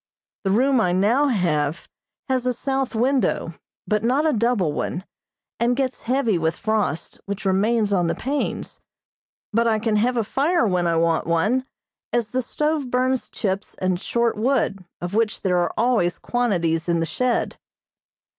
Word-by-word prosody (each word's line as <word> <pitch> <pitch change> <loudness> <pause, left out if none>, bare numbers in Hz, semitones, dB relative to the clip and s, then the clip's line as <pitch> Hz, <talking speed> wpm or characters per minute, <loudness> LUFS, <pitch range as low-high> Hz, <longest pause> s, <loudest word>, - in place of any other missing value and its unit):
The 195 - 0
room 255 +5 +3
I 180 -4 +2
now 225 +10 +3
have 165 - 0 0.4
has 255 -2 0
a 250 - +2
south 270 0 -2
window, 240 -8 +1 0.3
but 210 0 0
not 260 +6 +2
a 310 - +3
double 220 -8 +1
one, 175 +4 -3 0.6
and 240 +1 +2
gets 260 -1 -2
heavy 240 -8 +2
with 160 +1 0
frost, 215 -8 -2
which 200 0 -4
remains 205 +2 +2
on 175 -3 +2
the - - 0
panes; 280 +2 -3 0.7
but 230 +2 +3
I 220 -1 +3
can 215 0 0
have 245 +3 +1
a 230 - +2
fire 290 - +1
when 180 -4 +1
I 165 - +1
want 165 0 +1
one, 215 +11 +1 0.4
as 235 -3 0
the 255 +3 0
stove 300 +2 -1
burns 255 +1 0
chips 195 -2 -3
and 185 -1 -1
short 235 -1 0
wood, 215 -4 0 0.2
of 175 +2 -4
which 220 0 0
there 180 -2 +2
are 175 - 0
always 220 -7 +2
quantities 175 -9 0
in 170 -1 +2
the 165 - +1
shed. 250 +7 -1
220 Hz, 165 wpm, -23 LUFS, 180-255 Hz, 0.7 s, room